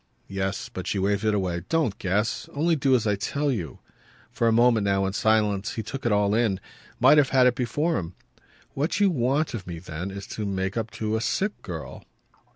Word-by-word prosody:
Yes, 95 0 -2
but 90 - -7
she - - -1
waved 100 +2 0
it 105 -1 +2
away. 90 -3 -1
"Don't 145 -11 0
guess. 105 +4 -1
Only 165 +3 +2
do 135 -3 +3
as 115 - +1
I 105 -1 +2
tell 140 +8 -1
you." 90 - -4 0.5
For 115 0 0
a - - +4
moment 115 -1 +4
now, 95 -1 +1
in 95 - -2
silence, 105 -2 +1
he 110 - -3
took 135 +3 -4
it - - +1
all 105 0 +2
in, 110 -4 +1 0.4
might 150 - +7
have 140 -2 +3
had 130 -1 +4
it 125 - +5
before 145 +7 0
him. 85 +1 -7 0.6
"What 150 +9 -1
you 200 -2 +4
want 140 +2 0
of 105 -7 -6
me 85 -2 -5
then 85 +2 -6
is 100 0 -7
to 105 - -4
make 95 0 -2
up 115 -1 -2
to 110 0 -2
a - - -3
sick 200 - 0
girl." - - -7
110 Hz, 215 wpm, -25 LUFS, 95-130 Hz, 0.6 s, might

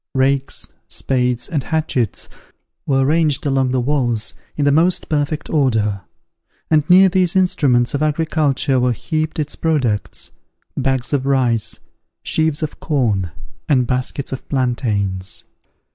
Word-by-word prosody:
Rakes, 135 +1 0
spades, 125 -2 0
and 150 -4 -1
hatchets, 140 -8 -1 0.6
were 135 -1 +2
ranged 155 0 +1
along 135 -2 +1
the 130 0 +1
walls 120 -4 0 0.2
in 145 - +1
the 145 - +4
most 170 +5 +2
perfect 150 0 -1
order; 110 - +1 0.7
and 155 -2 +3
near 190 +2 +8
these 185 -1 +1
instruments 140 -9 +2
of 140 - -1
agriculture 150 -3 +1
were 125 0 +2
heaped 155 +6 -3
its 150 -2 -2
products, 130 -10 -1 0.4
bags 135 0 -1
of 135 -1 0
rice, 125 -5 +1 0.4
sheaves 160 -1 0
of 155 - -5
corn, 110 - 0 0.4
and 130 -4 +3
baskets 130 +3 -2
of 130 - -7
plantains. 105 -8 -1
135 Hz, 130 wpm, -19 LUFS, 125-155 Hz, 0.7 s, near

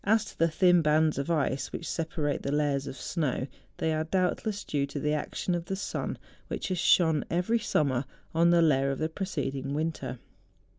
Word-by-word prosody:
to - - -15 0.3
tlie 165 - +3
tliin 175 +1 +4
bands 155 -1 +3
of 140 - -3
ice 145 -4 0
which 170 - -5
separate 160 -3 -2
the 140 - -2
layers 145 -2 +1
of 130 - -6
snow, 130 -1 -1 0.3
they 160 - 0
are 155 0 0
doubtless 190 +4 0
due 145 -2 -1
to 145 - -5
the 150 +2 0
'action 155 +4 -2
of 170 -1 -2
the 190 - -2
sun, 195 - -3 0.3
which - - -4
has 185 -2 -1
shone 160 -4 +4
every 180 +7 +1
summer 140 - +1 0.3
on 165 +1 +4
the 170 -1 +5
layer 135 -3 +3
of 135 - -1
the 155 - 0
preceding 140 -6 -3
winter. 150 -5 -2
155 Hz, 190 wpm, -29 LUFS, 140-175 Hz, 0.3 s, the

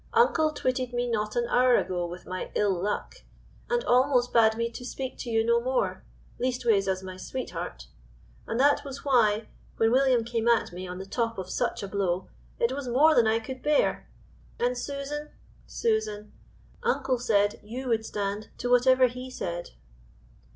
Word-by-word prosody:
Uncle 390 -10 +4
twitted 255 -4 -2
me 245 0 0
not 215 -2 -1
an 240 -1 +1
hour 250 0 +4
ago 180 -1 -1
with 175 +1 -9
my 185 0 -5
ill 205 -2 +2
luck, 200 - -3 0.5
and 480 0 +1
almost 250 - +3
bade 220 -1 +5
me 230 0 0
to 235 +1 -9
speak 260 +1 -5
to 240 - -6
you 225 -1 +2
no 235 0 +3
more, 255 +1 -1 0.4
leastways 240 -6 +1
as 190 0 -1
my 185 -1 -7
sweetheart; 185 - -6 0.6
and 230 - -2
that 285 +2 +4
was 275 -1 -8
why, 220 -5 +3 0.3
when 225 0 +3
William 255 -2 +4
came 230 0 -2
at 235 -6 +2
me 185 +1 -6
on 180 0 -6
the 190 - -6
top 230 +3 -2
of 185 -1 -5
such - - -1
a - - -3
blow, 190 -2 -1 0.3
it 235 - +1
was 270 0 -4
more 285 +6 +5
than 235 -6 +4
I 220 +1 +3
could 255 +3 -7
bear; 300 -1 +1 0.5
and 245 +1 +1
Susan 285 +3 -5 0.4
Susan 215 -2 -1 0.5
uncle 270 - 0
said 205 -4 +2
you 250 +5 -6
would 225 -2 +1
stand 205 0 -3
to 245 - -2
whatever 255 +1 +5
he 250 +1 -4
said." 175 -8 -5
235 Hz, 175 wpm, -27 LUFS, 210-255 Hz, 0.6 s, bade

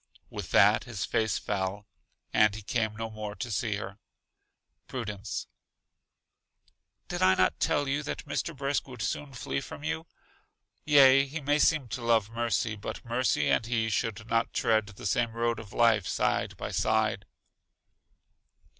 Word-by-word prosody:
With - - -6
that 105 +3 +5
his 115 -6 -4
face 110 -1 0
fell, 100 0 -3 0.5
and 105 -1 +4
he 110 - -8
came 110 0 -1
no 115 +1 -5
more 105 -1 -6
to 120 0 -5
see 110 0 -1
her. 100 0 -7 0.9
Prudence: 105 -6 -4 1.6
Did - - -4
I 95 0 +5
not 95 - +2
tell 145 -1 +1
you 140 +2 0
that 150 - -5
Mr. 150 +1 -3
Brisk 140 +1 -1
would 125 -3 -6
soon 145 -1 -3
flee 70 - -3
from - - -9
you? 160 +1 -3 0.8
Yea, 140 -2 +7
he 150 +4 -5
may 145 +1 +1
seem 150 -4 +3
to 125 - -4
love 115 -2 +2
Mercy, 115 -2 0
but 110 +3 -7
Mercy 120 +2 +1
and 110 - +2
he 115 -2 0
should 110 -1 -2
not 115 0 0
tread 110 -2 +2
the 105 -1 -11
same 115 +3 +1
road 115 -1 0
of 110 -3 -10
life 115 -5 +3
side - - 0
by - - -5
side. 110 -2 +1
115 Hz, 155 wpm, -29 LUFS, 105-130 Hz, 1.6 s, Yea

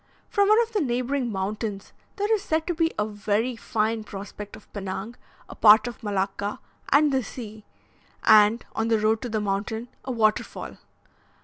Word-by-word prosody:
From 405 -1 +3
one 430 +1 +6
of 460 - -8
the 420 - +1
neighbouring 250 -1 -1
mountains 200 +1 -4 0.2
there 410 +2 +1
is 430 - +1
said 320 -4 -1
to 350 - -1
be 330 0 +1
a 210 - +1
very 215 +3 -1
fine 220 0 -1
prospect 205 0 -8
of 215 - -15
Pinang, 195 +3 -5 0.3
a - - -9
part 215 +2 +7
of 240 - -7
Malacca, 200 0 -2 0.3
and 295 +1 +5
the 265 -1 +2
sea, 220 -1 -9 0.6
and, 215 +1 +6
on 220 - 0
the 225 -1 +3
road 215 +1 +1
to 245 - -4
the 215 -1 -1
mountain, 210 +3 -2
a 260 - -4
waterfall. 215 -3 0
220 Hz, 175 wpm, -25 LUFS, 210-255 Hz, 0.6 s, part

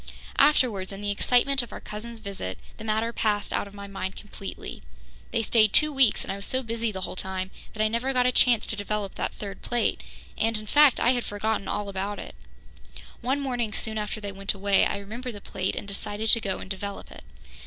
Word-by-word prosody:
Afterwards, 245 -10 +4
in 195 0 -7
the 205 0 -1
excitement 250 +6 +3
of 240 - -9
our - - -6
cousins' 225 +2 -7
visit, 195 - -5 0.2
the 220 - -8
matter 220 +1 0
passed 210 -3 0
out - - 0
of 200 - -13
my 200 0 -7
mind 195 -1 -4
completely. 200 -1 -8 0.5
They 230 - 0
stayed 215 -2 +4
two 305 0 +5
weeks, 265 -5 +4
and - - -3
I - - -5
was 200 - -2
so 260 0 +1
busy 230 -1 -1
the 190 -2 -5
whole 185 - -4
time 190 0 -3 0.2
that 215 - 0
I - - +4
never 235 +4 0
got 250 -1 +3
a 250 - +5
chance 240 -2 +4
to - - -1
develop 205 -1 -2
that - - -3
third 200 -2 -7
plate 240 -1 0 0.4
and, 225 0 +3
in 215 - -4
fact, 290 +3 +6
I 245 - +5
had 245 -2 +1
forgotten 205 0 -1
all 205 -1 -2
about 200 +1 -3
it. - - -7 0.9
One 265 +4 +1
morning 245 -6 -1
soon 220 -2 -1
after 210 +1 -3
they 205 -1 -4
went 195 +1 -2
away, 195 0 +4
I - - -2
remembered 225 +4 -6
the - - -7
plate 190 -1 -2
and - - -5
decided 205 +2 -2
to 230 - +6
go 195 -3 -1
and - - -8
develop 200 +1 -5
it. - - -11
215 Hz, 225 wpm, -27 LUFS, 200-235 Hz, 0.9 s, fact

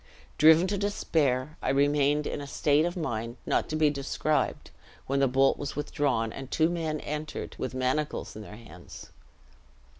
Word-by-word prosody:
Driven 160 +3 +7
to 200 +1 -1
despair, 155 -8 0
I - - -1
remained 145 +1 +2
in - - -3
a 140 - -7
state 150 +2 +2
of 175 +1 -3
mind 120 -6 -3
not - - 0
to 155 - -2
be 155 -1 +3
described, 145 +2 -1 0.3
when 140 +1 0
the 135 - +4
bolt 135 +2 +3
was 145 - -5
withdrawn, 135 -6 -1
and 135 -1 -8
two 160 +1 +2
men 160 -3 -2
entered, 150 0 -5
with - - -4
manacles 130 +4 -2
in 110 - -7
their 105 0 -10
hands. 90 -7 -12
145 Hz, 170 wpm, -28 LUFS, 130-155 Hz, 0.3 s, Driven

